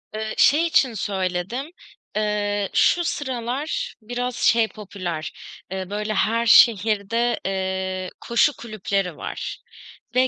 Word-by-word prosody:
Eee, 215 0 -3
şey 305 +5 +5
için 270 -6 +3
söyledim, 195 - -2 0.4
eee, 205 -1 0
şu 350 - +4
sıralar 285 - -3
biraz 245 +2 -3
şey 230 -1 +3
popüler, 185 -7 -5 0.4
eee, 190 -1 -4
böyle, 210 +1 -2
her 230 +3 +1
şehirde, 225 +1 +4
eee, 190 -1 -2
koşu 235 +5 +3
kulüpleri 195 -6 -2
var - - -5 0.6
ve 255 +1 +5
215 Hz, 110 wpm, -23 LUFS, 195-240 Hz, 0.6 s, şey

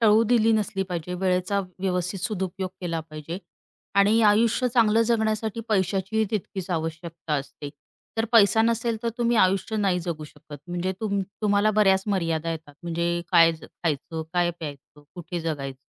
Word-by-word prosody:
टळू 220 0 +5
दिली 225 -1 +4
नसली 205 -2 0
पाहिजे. 175 +1 -3
वेळेचा 185 +2 +1 0.2
व्यवस्थित 180 0 -1
सदुपयोग 190 -2 -3
केला 170 -2 -2
पाहिजे 155 +2 -7 0.6
आणि 215 +3 +4
आयुष्य 225 +4 +4
चांगलं 225 -1 +4
जगण्यासाठी 220 0 0
पैशाचीही 195 +2 +1
तितकीच 190 -3 -4
आवश्यकता 165 -1 -4
असते. 145 +1 -5 0.5
तर 225 - +1
पैसा 220 0 +6
नसेल 230 0 +1
तर 235 - 0
तुम्ही 240 0 +2
आयुष्य 195 +2 +2
नाही 195 -4 +1
जगू 155 -3 -3
शकत. 145 0 -12
म्हणजे 175 +2 -2
तुम 200 -2 0 0.2
तुम्हाला 205 +1 +3
बऱ्याच 190 -1 +4
मर्यादा 165 -5 0
येतात, 155 -3 -7
म्हणजे 170 0 -1
काय 165 -1 +7 0.2
खायचं? 160 0 -3
काय 175 -1 +2
प्यायचं? 150 -3 -10
कुठे 175 -1 -5
जगायचं? 140 -5 -4
185 Hz, 145 wpm, -25 LUFS, 165-215 Hz, 0.6 s, काय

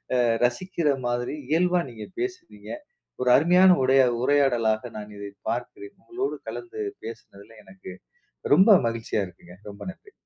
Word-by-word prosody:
அ - - +3 0.3
ரசிக்கிற 170 +5 -2 0.2
மாதிரி 120 +3 -2
இயல்பா 180 +3 +2
நீங்க 110 -3 -9
பேசுனீங்க, 365 -1 -6 0.5
ஒரு 125 - +2
அருமையான 180 +5 +6
உடை 130 +1 +4 0.2
உரையாடலாக 125 -5 +1
நான் 105 0 -8
இதை 100 0 -7 0.2
பார்க்கிறேன். 380 - -5
உங்களோடு 385 +3 -4
கலந்து 405 +4 -8 0.3
பேசினதில 115 - -11
எனக்கு 95 -1 -11 0.6
ரொம்ப 195 +7 +6 0.2
மகிழ்ச்சியா 115 -2 -2
இருக்குங்க, 90 0 -16 0.2
ரொம்ப 100 - -15
நன்றி! 410 - -20
130 Hz, 130 wpm, -25 LUFS, -, 0.6 s, அருமையான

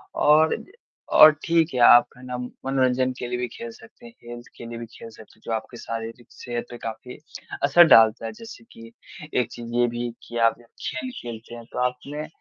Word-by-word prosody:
और, 155 +2 +4 0.5
और 155 0 +9
ठीक 165 -2 +2
है 125 - -2
आप 120 0 +8
है 125 - -15
ना, 125 -1 -5 0.3
मनोरंजन 130 -1 +1
के 125 - -4
लिए 125 0 -3
भी 125 - -2
खेल 235 0 -8
सकते 225 +1 -17
हैं, 235 - -13
हेल्थ 120 0 -9
के 120 - -9
लिए 115 0 -7
भी 115 - -6
खेल 115 - -11
सकते 110 0 -17
हैं। - - -33
जो - - -5
आपके 110 +2 -5
शारीरिक 115 +1 -7
सेहत 120 -1 -6
पे 120 - -8
काफ़ी 115 +3 -8 0.5
असर 145 +5 +7
डालता 115 -2 +5
है। - - -4
जैसे 225 0 -12
कि 230 0 -13 0.4
एक 125 -2 0
चीज 120 -1 -9
ये 120 0 +3
भी 120 0 -4 0.2
कि 120 - -6
आप 115 - 0 0.3
खेल-खेलते 120 -3 -7
हैं, 115 -1 -11
तो - - -4
आपने 130 +5 -3
125 Hz, 205 wpm, -24 LUFS, 120-150 Hz, 0.5 s, और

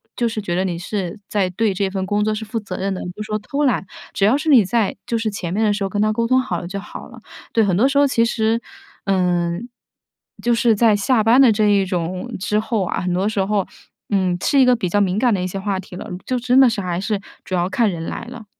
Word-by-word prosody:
就 235 -1 0
是 220 -1 -4
觉 175 -4 -3
得 185 - +1
你 180 -3 -2
是 190 +1 -4
在 195 -3 0
对 205 +2 0
这 195 +1 -1
份 190 -1 -3
工 205 +1 0
作， 215 - 0
是 215 +1 -4
负 220 +2 -4
责 190 -3 -6
任 195 +1 -2
的， 185 - -5
你 - - -5
不 210 - -9
说 215 0 -2
偷 285 +7 -2
懒。 250 -6 +1 0.3
只 195 - -1
要 230 +7 +4
是 310 - -6
你 265 -8 +7
在 215 +1 0
就 235 - -1
是 225 -1 -1
前 185 -4 -5
面 220 +3 +1
的 210 - +3
时 205 - -2
候， 195 - -1
跟 205 +2 -1
他 215 0 +2
沟 230 +2 0
通 255 +2 +3
好 180 -9 -3
了 - - -7
就 200 +1 -4
好 - - -10
了。 - - -13 0.3
对， 225 - +2
很 190 -3 +1
多 240 +9 +3
时 280 - 0
候 285 0 +5
其 230 -3 +2
实 230 0 0 0.4
嗯， 180 +1 0 0.7
就 240 - +2
是 230 -1 +3
在 215 0 +4
下 220 +3 +2
班 230 +5 +5
的 255 -4 +7
这 215 0 +2
一 200 -2 +3
种 180 +5 -3
之 210 +2 0
后 220 -3 -1
啊， - - -2
很 180 0 -1
多 185 +3 0
时 215 -3 0
候， 200 -1 0 0.4
嗯， 185 -3 +1
是 280 - +3
一 265 - +6
个 250 0 +5
比 200 -5 -2
较 205 +4 +1
敏 190 0 +1
感 245 -1 +3
的 190 - 0
一 180 - -1
些 195 +2 -5
话 195 -1 -2
题 185 -1 -10
了， - - -8 0.2
就 255 -1 -1
真 250 +2 +3
的 265 -2 +7
是 220 - -3
还 180 -1 -2
是 210 0 -1 0.2
主 - - -8
要 175 0 0
看 220 +3 +2
人 165 -2 -5
来 - - -5
了。 235 -2 -10
210 Hz, 300 characters per minute, -20 LUFS, 190-230 Hz, 0.7 s, 你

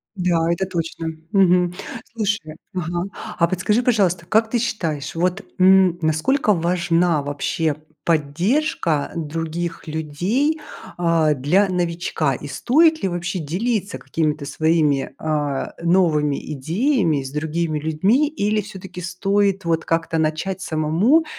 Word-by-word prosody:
Да, 170 -3 +1
это 190 +3 0
точно. 165 -2 -4 0.2
Мгм. 180 -2 +4 0.4
Слушай, 205 -8 -2 0.2
ага, 175 -1 -2 0.3
а 170 - +4
подскажи, 195 +6 +1
пожалуйста, 190 -8 +2
как 220 +5 +2
ты 240 - +1
считаешь, 165 -11 -2
вот, 180 +4 0 0.2
м, 185 -1 +6
насколько 205 - +2
важна 170 -2 +1
вообще 145 +2 -1 0.3
поддержка 165 - 0
других 165 +2 -4
людей, 180 - -1 0.4
а, 165 -3 +3
для 155 +9 +2
новичка? 170 -5 -1
И 145 - -8
стоит 315 - +3
ли 195 - +1
вообще 175 +1 -3
делиться 195 +7 -2
какими-то 155 -2 -2
своими, 155 -2 +1
а, 150 -3 -2
новыми 160 -5 +2 0.2
идеями 165 - +1
с 135 0 -7
другими 155 +2 -1
людьми 190 - +2
или 215 -8 0
все-таки 190 -3 -9
стоит 195 +2 0
вот 165 -1 +1
как-то 165 0 0
начать 160 +5 -1
самому 170 - +2
170 Hz, 120 wpm, -21 LUFS, 155-195 Hz, 0.4 s, м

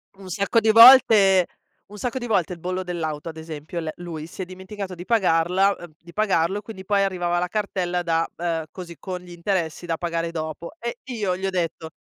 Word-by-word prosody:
Un 190 -1 -12
sacco 200 +5 +2
di 220 0 +1
volte 225 -6 +8 0.4
un 210 - -12
sacco 245 +3 -3
di 240 -2 -4
volte 190 -5 +1
il 175 - -10
bollo 180 +2 -3
dell'auto 165 -3 -4
ad 160 - -9
esempio, 160 +1 -6
le 160 -2 -3
lui 165 -3 -6
si 170 - -9
è - - -3
dimenticato 190 +1 -7
di 175 +1 -9
pagarla, 190 -2 +3
ehm 175 -3 -12
di 170 0 -15
pagarlo 195 -2 +1
e - - -11
quindi 200 -3 -10
poi 200 0 +2
arrivava 175 -3 0
la 180 - -1
cartella 180 -3 -2
da, 165 -1 +1
ehm 165 -1 -1
,così 170 -3 -9
con 185 +2 -5
gli 180 0 -13
interessi 175 -1 -2
da 165 -1 -2
pagare 170 -1 -2
dopo. 160 0 -5
E 235 -3 -5
io 215 -8 -2
gli 190 - -4
ho - - +1
detto: 165 -3 -3
180 Hz, 215 wpm, -23 LUFS, 170-200 Hz, 0.4 s, volte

